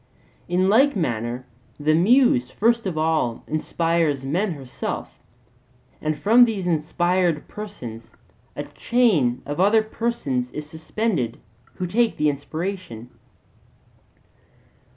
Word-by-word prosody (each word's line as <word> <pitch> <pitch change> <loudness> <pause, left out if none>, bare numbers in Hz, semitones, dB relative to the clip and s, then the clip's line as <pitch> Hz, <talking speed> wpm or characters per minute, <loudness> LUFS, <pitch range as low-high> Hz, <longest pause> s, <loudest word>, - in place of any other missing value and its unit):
In 180 +2 +2
like 260 +7 +4
manner 120 - -2 0.3
the 150 +1 +2
Muse 250 - +4
first 230 0 +1
of 170 -4 -3
all 155 -7 0
inspires 160 -2 0
men 180 +7 0
herself; 135 -4 -6 0.8
and 155 -1 -1
from 230 +4 +6
these 210 -6 -3
inspired 175 0 +1
persons 125 - -8 0.4
a - - -3
chain 185 - +1
of 145 +3 -4
other 210 +4 +4
persons 215 - -2
is 150 0 -6
suspended, 160 - -2 0.4
who 180 - -3
take 225 +5 +1
the 150 0 +3
inspiration. 145 - -5
170 Hz, 110 wpm, -23 LUFS, 145-215 Hz, 0.8 s, from